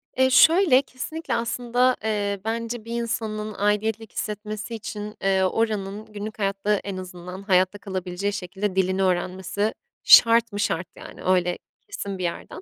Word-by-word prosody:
Eee, 260 0 +4
şöyle, 320 0 +6
kesinlikle 300 +5 -5
aslında, 245 +2 +1
eee, 205 -2 -1
bence 230 0 -3
bir 235 +1 -3
insanın 215 -2 -3
aidiyetlik 210 +2 0
hissetmesi 210 +2 -5
için, 210 -1 -6
eee, 190 -1 +2
oranın 210 0 -1
günlük 215 +1 -7
hayatta 200 +1 0
en 200 -1 -5
azından 180 0 -8
hayatta 185 0 +2
kalabileceği 190 0 -3
şekilde 190 +1 -3
dilini 190 0 +1
öğrenmesi 185 +3 -1 0.3
şart 230 0 +7
mı 205 - -5
şart, 175 -3 -1
yani, - - -11
öyle 180 -1 +2 0.2
kesin 200 - -6
bir 185 - -5
yerden. 170 -1 -5
210 Hz, 145 wpm, -24 LUFS, 190-230 Hz, 0.3 s, şart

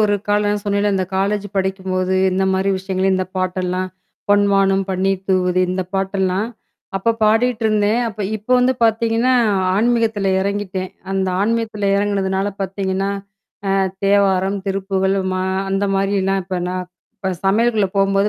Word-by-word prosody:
ஒரு 205 -1 +3
காலம். 205 0 +2
நான் 205 0 -1
சொன்னேன்ல 205 0 +1
இந்த 190 -1 0
காலேஜ் 205 +1 0
படிக்கும்போது 190 -1 -1 0.2
எந்த 190 +1 +1
மாரி 190 +1 +1
விஷயங்கள 190 0 -1
இந்த 185 0 0
பாட்டெல்லாம். 185 0 -1 0.4
பொன்வானம் 195 -1 +3
பன்னீர் 190 0 0
தூவுது 185 -1 +2
இந்த 185 +1 -1
பாட்டெல்லாம், 190 +1 0 0.5
அப்ப 230 +4 +1
பாடிட்டு 225 +2 +2
இருந்தேன். 215 +1 +2
அப்ப 215 -1 -8 0.2
இப்ப 215 +3 -13
வந்து 255 +1 +3
பார்த்தீங்கன்னா 230 +2 +2 0.4
ஆன்மீகத்தில 225 -3 +1
இறங்கிட்டேன். 190 -1 -3 0.2
அந்த 190 -1 0
ஆன்மீகத்தில 215 -1 0
இறங்குனதுனால 195 -1 0
பாத்தீங்கன்னா 195 0 -2 0.6
அ - - +2 0.3
தேவாரம், 195 -1 +2
திருப்புகழ், 195 0 0 0.2
மா 185 0 -1 0.3
அந்த 195 +1 +1
மாரிலாம் 195 0 +1
இப்ப 185 -1 -3
நான் 185 0 -3 0.3
இப்ப 190 -2 -3
சமையலுக்குள்ள 215 0 +2
போம்போது 195 +1 +3
195 Hz, 135 wpm, -19 LUFS, 190-205 Hz, 0.6 s, ஒரு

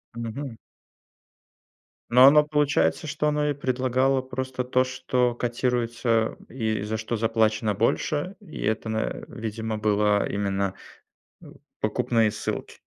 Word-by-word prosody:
Мгм. 115 +2 -5 1.5
Но 125 +2 +7
оно 150 +2 +8
получается, 145 - +1
что 150 0 -1
оно 150 0 +1
и - - +1
предлагало 130 0 +1
просто 130 0 -4
то, 130 +1 +2
что 125 -1 0
котируется 120 -2 0
и 110 -4 -2
за 110 +1 -3
что 110 +1 -3
заплачено 110 -1 +1
больше? 145 - 0
И 195 -7 -10
это, 110 +1 -1
на, 110 - -1
э, - - -3
видимо, 110 0 -4
было 105 -1 +2
именно 100 -1 -1 0.7
оу - - -14 0.2
покупные 115 -2 +1
ссылки. 105 - -4
120 Hz, 125 wpm, -25 LUFS, 110-130 Hz, 1.5 s, оно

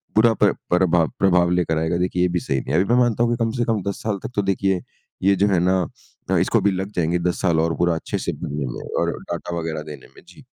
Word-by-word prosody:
बुरा 115 +1 +5
प्र - - +3 0.2
प्रभाव 90 -2 +3
प्रभाव 90 -2 +4
लेकर 85 -3 +1
आएगा, 80 +2 0
देखिए 90 0 -1
ये 90 - +4
भी 90 0 0
सही 65 -4 -1
नहीं - - -5
है। 90 - +4
अभी 115 +5 0
मैं 125 - +5
मानता 120 -1 +2
हूँ 120 - +1
कि 120 - 0
कम 115 - 0
से 120 - +1
कम 105 -3 0
10 - - -6
साल 105 -3 -1
तक - - -5
तो 100 - +2
देखिए 95 -1 0 0.4
ये 100 0 +4
जो 100 +2 +2
है 95 -4 +2
ना 95 0 +3 0.5
अ, 95 - +3
इसको 100 +6 +2
भी 100 +1 +3
लग 95 +2 -3
जाएँगे 85 +1 +1
10 - - -3
साल 85 -4 +2
और 80 0 +1
पूरा 85 -1 +2
अच्छे 80 - -3
से - - +2
बनने 70 -1 -3
में - - -7 0.2
और - - +1
डाटा 85 -1 -5
वग़ैरह 80 -2 -3
देने 75 -3 -11
में - - -15
जी। - - -16
90 Hz, 270 wpm, -22 LUFS, 85-100 Hz, 0.5 s, बुरा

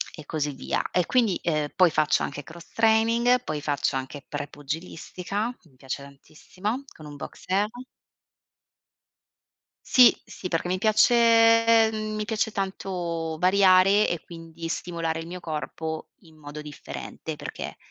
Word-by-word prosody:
e 155 - -11
così 150 -1 -2
via. 130 - -2
E 180 -2 +2
quindi, 230 -7 +2
ehm, 150 -3 0
poi 180 -3 +5
faccio 155 -1 +2
anche 145 +1 -5
cross 170 +4 -13
training, 230 +2 +3
poi 150 -9 -4
faccio 145 -1 -1
anche 130 +2 -7
pre-pugilistica, 165 - -5
mi 155 -7 -24
piace 135 +1 -6
tantissimo, 185 - -6
con 155 - -12
un 145 -1 -9
boxeur. 195 +7 -2 2.2
Sì, 250 -2 +7
sì, 185 - -7
perché 170 0 -1
mi 185 +1 0
piace, 230 +1 +5
mhmm, 215 -1 -4
mi 215 - -2
piace 220 0 -1
tanto 175 -5 -3
variare 190 +2 +5
e 170 - -2
quindi 165 -1 -9
stimolare 165 -1 -3
il 165 - -6
mio 180 +1 -7
corpo 160 0 -5
in 160 -4 -20
modo 150 0 -8
differente, 150 -1 -7
perché - - -7
175 Hz, 135 wpm, -26 LUFS, 155-215 Hz, 2.2 s, Sì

